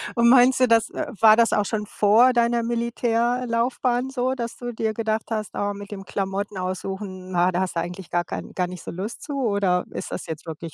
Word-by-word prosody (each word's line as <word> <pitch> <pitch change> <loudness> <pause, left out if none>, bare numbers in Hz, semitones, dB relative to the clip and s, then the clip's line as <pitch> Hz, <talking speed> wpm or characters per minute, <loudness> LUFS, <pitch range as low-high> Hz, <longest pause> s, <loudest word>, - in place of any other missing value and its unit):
Und 235 0 +5
meinst 255 +1 +6
du 255 - +5
das 230 -1 +3 0.3
war 220 -1 +8
das 230 0 +3
auch 210 -1 +2
schon 210 -1 -2
vor 225 +6 +4
deiner 235 0 +2
Militärlaufbahn 240 +1 0
so, 260 0 -1
dass 235 -3 -5
du 245 -1 -5
dir 220 0 -1
gedacht 220 0 -1
hast: 215 -2 -2
„Oh, 205 0 -1
mit 200 +1 -10
dem 195 -1 -7
Klamotten 195 +1 -3
aussuchen, 185 0 -5
na, 180 +1 +3
da 180 +2 0
hast 185 - -2
du 170 - +1
eigentlich 175 +1 -7
gar 175 0 +1
kein - - -6
gar 180 -1 -1
nicht 180 -2 -9
so - - -6
Lust 195 +6 -6
zu“, 290 - -6
oder 200 -5 +1
ist - - -6
das - - -5
jetzt 160 +1 -6
wirklich 160 0 -7
215 Hz, 220 wpm, -23 LUFS, 185-235 Hz, 0.3 s, war